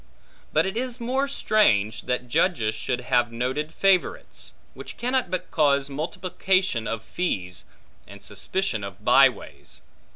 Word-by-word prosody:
But 155 - +3
it 190 +2 -3
is 250 +1 -3
more 260 +4 0
strange, 120 - +2
that 125 0 -2
judges 120 - +1
should 120 +3 -3
have 120 -1 +1
noted 130 +6 -2
favorites; 190 +1 0 0.2
which - - -10
cannot 250 -3 0
but 185 0 -4
cause 140 -3 +2
multiplication 180 -2 -1
of 115 -1 -3
fees, 95 - -3 0.4
and 100 +1 -13
suspicion 110 - -2
of 100 -2 -9
by - - +7
ways. - - -10
145 Hz, 135 wpm, -25 LUFS, 115-190 Hz, 0.4 s, by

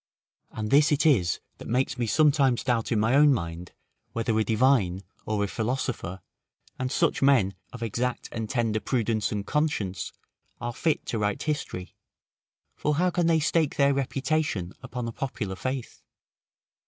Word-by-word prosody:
And 105 -1 -5
this 145 +2 +5
it 150 +2 +2
is 105 - +3 0.2
that - - -9
makes 130 +3 0
me 120 - 0
sometimes 140 0 +3
doubt 120 -3 0
in 110 - +2
my 110 +3 +2
own 145 +1 +6
mind, 85 -7 -3 0.4
whether 115 -1 0
a - - +3
divine, 110 -5 +2 0.2
or 105 -1 0
a - - 0
philosopher, 110 -3 -3 0.6
and 130 0 -2
such - - +1
men 130 -9 +4 0.2
of 125 -2 -7
exact 120 +3 -2
and 110 -2 -4
tender 115 -4 0
prudence 115 -3 0
and 100 -1 -3
conscience, 105 - -1 0.5
are 120 0 -3
fit 160 +4 0
to 115 - -2
write 105 -1 -1
history: 145 - -3 0.8
for 150 0 0
how 180 +4 +2
can 175 -1 +1
they 165 -1 +4
stake 155 -1 +1
their 140 0 +4
reputation 135 - -1
upon 120 -1 -5
a - - -3
popular 115 -6 -4
faith? 130 +4 -4
120 Hz, 160 wpm, -27 LUFS, 105-140 Hz, 0.8 s, own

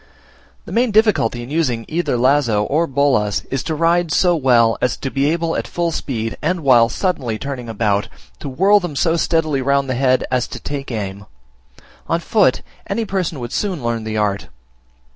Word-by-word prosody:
The - - -10
main 245 +1 +2
difficulty 210 - +2
in 120 - -10
using 130 -8 -1
either 155 -5 -1
lazo 125 -4 +2
or 155 +9 0
bolas 130 -7 +1
is 135 -1 -1
to 160 - -2
ride 170 +1 +1
so 175 +1 +3
well 120 -6 +3
as 125 - 0
to 135 - -5
be 140 +1 +1
able 165 0 -1
at - - -3
full 170 -1 -1
speed, 115 -7 -4
and 170 +3 -1
while 120 -5 +5
suddenly 130 - -2
turning 130 -2 -6
about, 105 -2 0 0.3
to 140 - -6
whirl 195 +10 +4
them 175 -6 -5
so 165 +3 +1
steadily 155 -4 0
round 140 +1 +1
the 130 - -1
head, 130 0 +2
as 125 -2 0
to - - -8
take 140 -1 -5
aim: 100 -4 -5 0.8
on - - +1
foot - - +2 0.2
any 230 - -2
person 185 -7 -2
would 120 -1 -6
soon 185 - -2
learn 115 -1 -2
the 110 0 -3
art. 100 -2 -1
140 Hz, 185 wpm, -19 LUFS, 120-165 Hz, 0.8 s, while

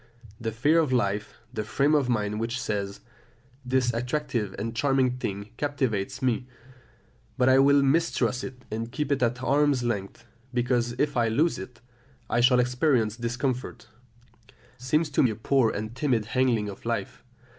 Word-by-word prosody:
The 115 -1 -3
fear 145 +9 +3
of 155 -5 +1
life, 105 -4 0 0.2
the 110 - -2
frame 140 +7 +1
of 140 -4 +2
mind 105 -3 0
which 115 +2 -2
says, 100 -4 -3 0.6
"This 125 -1 +1
attractive 120 -4 -2
and 115 +2 -4
charming 130 -1 +2
thing 100 -3 -5
captivates 130 -6 -2
me, 125 0 0 0.9
but 125 - +3
I 130 0 +6
will 140 +1 +5
mistrust 135 -4 +1
it 125 -1 -8
and 115 +2 -4
keep 145 +3 -2
it 140 -1 +1
at 125 +1 0
arm's 140 -1 +2
length, 115 -1 -3 0.3
because 120 -1 +1
if 145 +4 -1
I 120 -2 +2
lose 150 +10 +1
it, 120 -2 -10 0.5
I 120 - +3
shall 125 +1 +5
experience 125 -3 +2
discomfort," 120 +1 -3 0.9
seems 150 +5 0
to - - +3
me 130 - +4
a 110 - -3
poor 125 +2 +2
and 110 +2 -5
timid 125 -7 0
handling 120 -3 +1
of 100 - -8
life. 115 -4 -3
125 Hz, 160 wpm, -26 LUFS, 115-135 Hz, 0.9 s, I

